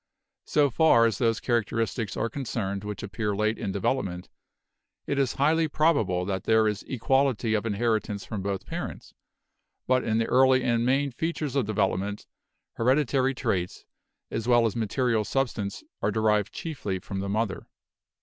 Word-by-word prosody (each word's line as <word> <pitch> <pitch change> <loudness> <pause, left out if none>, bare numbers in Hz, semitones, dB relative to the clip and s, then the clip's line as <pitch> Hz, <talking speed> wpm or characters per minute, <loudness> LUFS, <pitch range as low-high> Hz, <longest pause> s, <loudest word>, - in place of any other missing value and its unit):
So 145 -2 +2
far 120 -4 +5
as 115 -4 0
those 115 -2 +2
characteristics 115 -1 -1
are 115 - 0
concerned 110 -7 -3
which 105 0 -6
appear 105 +1 -2
late 110 +2 0
in 95 - -2
development, 95 -3 -2 0.8
it 140 - -1
is 135 -4 +1
highly 160 +3 +3
probable 140 - +1
that 95 0 -3
there 110 -1 +4
is 105 -1 -1
equality 130 -2 +1
of 110 +1 0
inheritance 110 -1 -1
from 105 -3 -4
both 100 0 -3
parents, - - -6 0.7
but 130 0 +2
in 110 0 0
the 115 - +2
early 130 +1 +4
and 120 -2 +1
main 140 +2 +2
features 150 +1 -3
of 135 -6 +1
development, 100 -1 -1 0.5
hereditary 130 +1 +2
traits, 95 -8 -2 0.5
as 115 +1 -3
well 120 -1 +5
as 110 - -1
material 115 0 0
substance, 115 - -2 0.2
are - - +1
derived 105 -2 +1
chiefly 130 - -4
from 95 +1 -6
the 100 +1 -3
mother. 105 -1 -2
115 Hz, 155 wpm, -27 LUFS, 105-130 Hz, 0.8 s, far